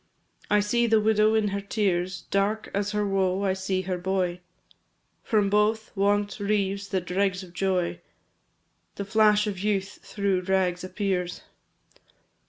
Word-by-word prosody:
I 210 Hz, 0 st, +4 dB
see 235 Hz, +3 st, +1 dB
the 220 Hz, -1 st, +4 dB
widow 215 Hz, 0 st, +3 dB
in 215 Hz, -2 st, +2 dB
her 200 Hz, 0 st, -3 dB
tears, 185 Hz, -3 st, -1 dB
Dark 205 Hz, +2 st, 0 dB
as 200 Hz, +1 st, 0 dB
her 210 Hz, 0 st, 0 dB
woe 195 Hz, -1 st, 0 dB
I 190 Hz, -1 st, +2 dB
see 190 Hz, 0 st, -2 dB
her 180 Hz, -1 st, -3 dB
boy 180 Hz, -1 st, -1 dB, 0.8 s
From 210 Hz, -3 st, +1 dB
both, 210 Hz, +2 st, +1 dB
want 205 Hz, +1 st, +1 dB
reaves 200 Hz, -1 st, -1 dB
the 195 Hz, -2 st, 0 dB
dregs 185 Hz, +1 st, -1 dB
of 175 Hz, -2 st, -13 dB
joy; 185 Hz, -1 st, -1 dB, 0.9 s
The 200 Hz, -, -4 dB
flash 210 Hz, 0 st, +4 dB
of 200 Hz, -3 st, -4 dB
youth 195 Hz, -1 st, -1 dB
through 200 Hz, -3 st, -1 dB
rags 185 Hz, -1 st, 0 dB
appears. 185 Hz, -1 st, -2 dB
195 Hz, 145 wpm, -26 LUFS, 185-210 Hz, 0.9 s, I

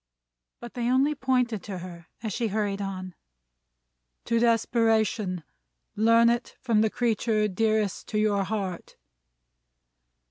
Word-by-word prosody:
But, 240 Hz, -, -9 dB
they 240 Hz, -1 st, -1 dB
only 270 Hz, +4 st, +3 dB
pointed 250 Hz, -6 st, 0 dB
to 195 Hz, -3 st, -5 dB
her, 170 Hz, -2 st, -9 dB, 0.2 s
as 215 Hz, -3 st, -3 dB
she 230 Hz, -, -1 dB
hurried 205 Hz, -1 st, -1 dB
on; 185 Hz, -2 st, -5 dB, 1.1 s
"To 230 Hz, -, +1 dB
desperation! 225 Hz, -5 st, +1 dB, 0.5 s
Learn 230 Hz, +2 st, +5 dB
it 235 Hz, +1 st, 0 dB
from 225 Hz, -4 st, +2 dB
the 220 Hz, -, +3 dB
creature 220 Hz, -2 st, +1 dB
dearest 215 Hz, 0 st, 0 dB
to 215 Hz, -, -3 dB
your 210 Hz, -2 st, +2 dB
heart!" 190 Hz, -4 st, -4 dB
220 Hz, 120 wpm, -26 LUFS, 200-235 Hz, 1.1 s, Learn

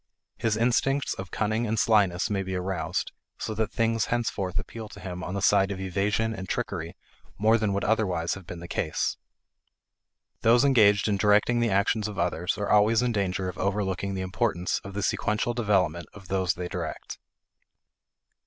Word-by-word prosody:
His 110 Hz, -2 st, 0 dB
instincts 130 Hz, +4 st, +1 dB
of 95 Hz, -1 st, -7 dB
cunning 110 Hz, +2 st, -1 dB
and 110 Hz, +1 st, -1 dB
slyness 100 Hz, -6 st, +3 dB
may 100 Hz, -1 st, 0 dB
be 95 Hz, -1 st, -4 dB
aroused, 90 Hz, -1 st, -2 dB, 0.3 s
so 110 Hz, -, -4 dB
that 110 Hz, 0 st, -1 dB
things 115 Hz, -1 st, +1 dB
henceforth 110 Hz, -6 st, -2 dB
appeal 110 Hz, +1 st, -6 dB
to -, -, -12 dB
him 90 Hz, -2 st, -6 dB
on 90 Hz, -, -4 dB
the 100 Hz, -, -2 dB
side 100 Hz, -1 st, +4 dB
of 100 Hz, -2 st, -4 dB
evasion 100 Hz, +4 st, 0 dB
and 95 Hz, -3 st, -7 dB
trickery -, -, -3 dB, 0.4 s
more 110 Hz, +3 st, +4 dB
than 110 Hz, -2 st, 0 dB
would 100 Hz, -, -1 dB
otherwise 95 Hz, -6 st, +1 dB
have 95 Hz, -3 st, -9 dB
been 85 Hz, -2 st, -7 dB
the 85 Hz, -, -8 dB
case. 80 Hz, -, -1 dB, 1.2 s
Those 120 Hz, +4 st, +5 dB
engaged 105 Hz, -7 st, +5 dB
in 105 Hz, -2 st, +1 dB
directing 105 Hz, +4 st, +3 dB
the 120 Hz, -1 st, +2 dB
actions 100 Hz, +2 st, +1 dB
of 105 Hz, -3 st, -7 dB
others 85 Hz, 0 st, -1 dB
are 105 Hz, -, -2 dB
always 110 Hz, +3 st, +4 dB
in 125 Hz, -, +1 dB
danger 95 Hz, -3 st, -1 dB
of 90 Hz, -, -6 dB
overlooking 100 Hz, 0 st, -1 dB
the 95 Hz, -, -3 dB
importance 95 Hz, -1 st, -1 dB
of 100 Hz, 0 st, -9 dB
the 100 Hz, -, -2 dB
sequential 110 Hz, +4 st, 0 dB
development 95 Hz, -8 st, +1 dB
of 95 Hz, -3 st, -13 dB
those 95 Hz, -2 st, +1 dB
they 90 Hz, 0 st, -4 dB
direct. -, -, -6 dB
100 Hz, 180 wpm, -27 LUFS, 95-110 Hz, 1.2 s, Those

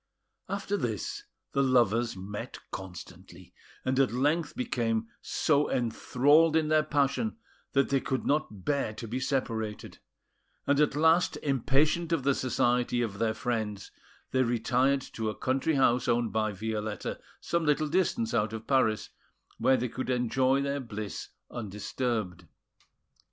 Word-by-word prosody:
After 200 Hz, +1 st, -1 dB
this, 115 Hz, -, -3 dB, 0.3 s
the 140 Hz, -, +1 dB
lovers 120 Hz, -4 st, +2 dB
met 100 Hz, +3 st, -6 dB
constantly, 90 Hz, -1 st, -10 dB, 0.3 s
and 130 Hz, +1 st, +1 dB
at 135 Hz, -, +3 dB
length 145 Hz, +6 st, 0 dB
became 115 Hz, -, -1 dB
so 150 Hz, -2 st, +1 dB
enthralled 145 Hz, +6 st, +3 dB
in 155 Hz, -1 st, +2 dB
their 155 Hz, 0 st, +5 dB
passion 150 Hz, -, 0 dB, 0.4 s
that 140 Hz, 0 st, +3 dB
they 140 Hz, -, +3 dB
could 130 Hz, -1 st, -2 dB
not 110 Hz, -, -1 dB
bear 140 Hz, -7 st, 0 dB
to 115 Hz, -, -6 dB
be 120 Hz, +4 st, -2 dB
separated; 115 Hz, -5 st, -3 dB, 0.7 s
and 140 Hz, 0 st, +2 dB
at 150 Hz, -2 st, +3 dB
last, 160 Hz, +1 st, +3 dB
impatient 145 Hz, +5 st, +2 dB
of 165 Hz, -5 st, +1 dB
the 140 Hz, +1 st, +3 dB
society 125 Hz, -1 st, +1 dB
of 100 Hz, -3 st, -4 dB
their 110 Hz, -1 st, +1 dB
friends, 110 Hz, -4 st, -3 dB, 0.4 s
they 130 Hz, -, +2 dB
retired 125 Hz, +3 st, +2 dB
to 110 Hz, -3 st, -4 dB
a 105 Hz, -, -5 dB
country 135 Hz, +4 st, 0 dB
house 125 Hz, -2 st, +3 dB
owned 120 Hz, -2 st, +1 dB
by 110 Hz, -1 st, +1 dB
Violetta 105 Hz, +1 st, -4 dB, 0.2 s
some 170 Hz, -1 st, -1 dB
little 150 Hz, 0 st, +2 dB
distance 190 Hz, +8 st, 0 dB
out 105 Hz, 0 st, +1 dB
of 110 Hz, 0 st, -6 dB
Paris, 115 Hz, -5 st, +2 dB, 0.5 s
where 130 Hz, 0 st, +4 dB
they 125 Hz, +1 st, -1 dB
could 130 Hz, +2 st, -5 dB
enjoy 130 Hz, +2 st, +2 dB
their 140 Hz, 0 st, -1 dB
bliss 110 Hz, -5 st, -6 dB, 0.2 s
undisturbed. 105 Hz, -3 st, -3 dB
125 Hz, 140 wpm, -29 LUFS, 110-145 Hz, 0.7 s, their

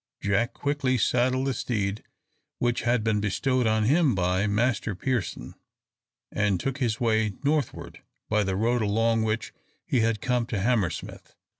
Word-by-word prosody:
Jack 100 Hz, +5 st, 0 dB
quickly 140 Hz, -3 st, 0 dB
saddled 130 Hz, +2 st, +1 dB
the 135 Hz, -, 0 dB
steed 105 Hz, -4 st, -2 dB, 0.5 s
which 120 Hz, 0 st, 0 dB
had 120 Hz, -1 st, +1 dB
been 110 Hz, -2 st, +1 dB
bestowed 125 Hz, +4 st, +1 dB
on 110 Hz, 0 st, +2 dB
him 140 Hz, -, +3 dB
by 90 Hz, +2 st, +1 dB
Master 110 Hz, 0 st, 0 dB
Pearson, 105 Hz, -, -3 dB, 0.8 s
and 100 Hz, -3 st, +1 dB
took 135 Hz, +5 st, -3 dB
his 120 Hz, -3 st, 0 dB
way 110 Hz, -3 st, +1 dB
northward 145 Hz, 0 st, -2 dB, 0.3 s
by 105 Hz, -1 st, +2 dB
the 95 Hz, -1 st, -1 dB
road 115 Hz, +4 st, +1 dB
along 115 Hz, +2 st, +2 dB
which 110 Hz, 0 st, -2 dB, 0.3 s
he 125 Hz, -, +1 dB
had 115 Hz, -1 st, +1 dB
come 125 Hz, -3 st, 0 dB
to 110 Hz, -5 st, -2 dB
Hammersmith. 105 Hz, -4 st, -2 dB
115 Hz, 150 wpm, -26 LUFS, 105-125 Hz, 0.8 s, him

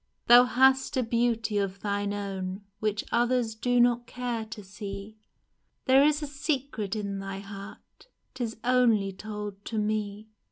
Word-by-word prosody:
Thou 245 Hz, +1 st, +8 dB
hast 265 Hz, +2 st, +3 dB
a 255 Hz, -, +2 dB
beauty 230 Hz, -2 st, 0 dB
of 195 Hz, -1 st, -3 dB
thine 205 Hz, -1 st, -1 dB
own 195 Hz, -1 st, -4 dB, 0.2 s
Which 215 Hz, -1 st, -1 dB
others 240 Hz, -1 st, +2 dB
do 245 Hz, +2 st, +1 dB
not 240 Hz, 0 st, +3 dB
care 245 Hz, -3 st, -3 dB
to 220 Hz, -1 st, -9 dB
see 200 Hz, +2 st, -8 dB, 0.3 s
— -, -, -48 dB
There 265 Hz, +1 st, +6 dB
is 300 Hz, +1 st, +2 dB
a -, -, -3 dB
secret 275 Hz, -, -2 dB
in 200 Hz, -2 st, -3 dB
thy 195 Hz, 0 st, -5 dB
heart, 200 Hz, -, -11 dB, 0.3 s
'Tis 235 Hz, -4 st, -4 dB
only 240 Hz, -5 st, +3 dB
told 205 Hz, 0 st, -7 dB
to 225 Hz, -, -4 dB
me 210 Hz, 0 st, -2 dB
220 Hz, 155 wpm, -28 LUFS, 200-245 Hz, 0.3 s, Thou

